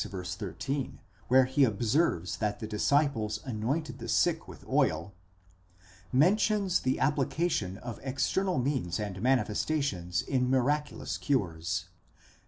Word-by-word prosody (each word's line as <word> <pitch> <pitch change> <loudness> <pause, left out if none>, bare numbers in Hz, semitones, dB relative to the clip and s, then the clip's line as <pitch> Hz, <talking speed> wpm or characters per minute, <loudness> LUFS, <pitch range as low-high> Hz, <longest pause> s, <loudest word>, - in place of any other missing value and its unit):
13, 95 - -4 0.3
where 130 +1 +6
he 130 +2 +2
observes 110 - +1
that 105 +1 -1
the - - -4
disciples 110 -2 +1
anointed 125 +3 -2
the 115 - -6
sick 165 +6 +2
with 85 -6 -12
oil), 80 +5 +1 1.0
mentions 190 - +3
the 130 - 0
application 140 - 0
of 120 -1 -7
external 135 +7 0
means 125 - -1
and 100 -3 -4
manifestations 120 - 0
in 125 -2 0
miraculous 145 +3 0
cures. 90 - -1
125 Hz, 110 wpm, -30 LUFS, 100-145 Hz, 1.0 s, where